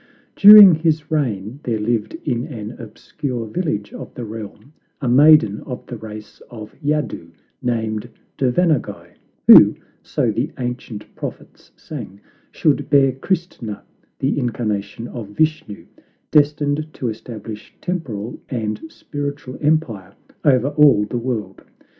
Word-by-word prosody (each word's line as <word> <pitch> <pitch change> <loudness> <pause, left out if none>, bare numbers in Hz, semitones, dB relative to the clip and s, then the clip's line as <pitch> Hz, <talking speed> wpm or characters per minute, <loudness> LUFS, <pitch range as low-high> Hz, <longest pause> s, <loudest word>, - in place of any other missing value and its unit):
During 205 -2 +10
his 160 -1 0
reign 120 -5 -2
there 115 -5 -2
lived 110 +4 -2
in 125 -4 -1
an 110 -8 -7
obscure 120 +2 -6
village 105 - -3
of - - -9
the 120 - -6
realm 110 +4 -9 0.3
a 135 - -3
maiden 130 -5 +5
of 125 -3 -8
the 120 - -7
race 110 -1 -11
of 110 -2 -10
Yadu, 150 - -2 0.3
named 115 -2 -2 0.3
Devanaguy, 145 +3 0 0.4
who, - - +9 0.3
so - - -1
the - - -2
ancient 125 -4 -5
prophets - - -9
sang, 95 +2 -9 0.3
should - - 0
bear 135 -1 +4
Christna, 135 - -4 0.4
the 135 +2 0
incarnation 115 -2 -3
of 115 -4 -7
Vishnu, 155 -3 -2 0.5
destined 150 0 +1
to 125 - -4
establish 110 -1 -8
temporal 120 - -5
and 110 -4 -3
spiritual 145 -4 -6
empire 125 - -1 0.3
over 135 -2 +3
all 145 -7 +5
the 120 +3 -4
world. 120 -3 -4
125 Hz, 125 wpm, -20 LUFS, 110-150 Hz, 0.5 s, During